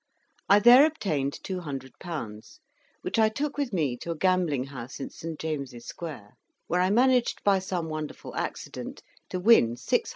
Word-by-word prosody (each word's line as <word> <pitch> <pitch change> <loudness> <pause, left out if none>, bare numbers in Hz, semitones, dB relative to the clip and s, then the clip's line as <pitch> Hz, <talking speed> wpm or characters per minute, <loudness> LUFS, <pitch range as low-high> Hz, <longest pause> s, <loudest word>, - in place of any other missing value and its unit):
I 200 - +8
there 240 +6 +8
obtained 155 - -2
200£., 140 - -6 0.4
which - - -1
I 220 -1 +5
took 285 +6 -3
with 285 -4 -2
me 150 - 0
to 170 - -8
a 165 - -1
gambling 175 -6 +2
house 130 -1 -8
in 135 - -5
St. 165 -1 -7
James' 140 -7 -4
Square, 130 -12 -8 0.3
where 180 +1 +1
I 185 - +3
managed, 250 +3 +3
by 200 -1 +4
some 180 -3 -3
wonderful 155 -1 -6
accident, - - -5 0.3
to 185 - -3
win 180 - +5
600£. 120 - 0
165 Hz, 160 wpm, -27 LUFS, 140-200 Hz, 0.4 s, I